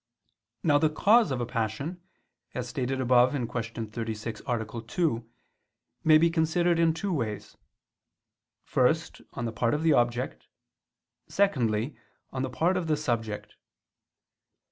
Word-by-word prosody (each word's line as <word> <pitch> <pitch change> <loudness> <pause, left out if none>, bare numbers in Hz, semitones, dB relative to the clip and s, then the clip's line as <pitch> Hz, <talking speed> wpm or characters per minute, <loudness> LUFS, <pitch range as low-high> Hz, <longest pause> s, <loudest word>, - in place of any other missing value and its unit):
Now 145 -2 +4
the 155 0 +3
cause 215 +9 +4
of 130 -2 -2
a - - 0
passion, 120 - -3 0.5
as 125 -1 -3
stated 130 +1 -2
above 125 +1 +4
(Q. 115 -3 -3
36, 110 0 -5
A. 115 -1 -2
2), 120 -6 -1 0.7
may 155 -1 +7
be 165 +1 +3
considered 165 +1 +2
in 165 -1 +4
two 195 +2 -2
ways: 110 - -3 1.1
first, - - +1
on 120 - -4
the 115 - -2
part 115 +4 +1
of 150 - -2
the 160 -2 +5
object; 120 0 0 0.8
secondly, 130 - +1 0.4
on 130 - -2
the 130 - -1
part 175 +8 +1
of 175 -3 -2
the 155 -1 +2
subject. 115 -7 -3
130 Hz, 135 wpm, -28 LUFS, 115-160 Hz, 1.1 s, may